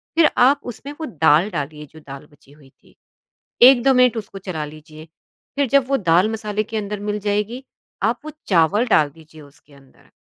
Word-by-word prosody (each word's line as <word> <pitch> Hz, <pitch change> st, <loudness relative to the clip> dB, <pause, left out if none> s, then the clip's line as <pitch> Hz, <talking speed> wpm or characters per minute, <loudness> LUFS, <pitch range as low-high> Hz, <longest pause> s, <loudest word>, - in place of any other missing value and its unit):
फिर 325 Hz, -1 st, +5 dB
आप 275 Hz, +3 st, +4 dB
उसमें 285 Hz, +6 st, -10 dB
वो -, -, -3 dB
दाल 160 Hz, 0 st, +2 dB
डालिए 150 Hz, -1 st, -5 dB
जो 160 Hz, -, -14 dB
दाल 140 Hz, +2 st, -10 dB
बची 140 Hz, -1 st, -23 dB
हुई 145 Hz, -2 st, -20 dB
थी। -, -, -28 dB, 0.7 s
1-2 265 Hz, +1 st, +6 dB
मिनट 250 Hz, -1 st, +3 dB
उसको 205 Hz, -3 st, -7 dB
चला 180 Hz, -5 st, -5 dB
लीजिए 155 Hz, +1 st, -13 dB, 0.5 s
फिर 280 Hz, -3 st, 0 dB
जब 275 Hz, -1 st, +3 dB
वो 275 Hz, -, +2 dB
दाल 180 Hz, 0 st, +2 dB
मसाले 215 Hz, -1 st, -3 dB
के 220 Hz, +1 st, -7 dB
अंदर 205 Hz, 0 st, -5 dB
मिल 210 Hz, -, -2 dB
जाएगी, 210 Hz, +5 st, -3 dB, 0.4 s
आप 230 Hz, +3 st, 0 dB
वो 310 Hz, -, -8 dB, 0.2 s
चावल 195 Hz, +6 st, +2 dB
डाल 150 Hz, -8 st, +3 dB
दीजिए 160 Hz, -1 st, -16 dB
उसके 140 Hz, 0 st, -20 dB
अंदर। 135 Hz, -1 st, -22 dB
200 Hz, 190 wpm, -20 LUFS, 155-240 Hz, 0.7 s, 1-2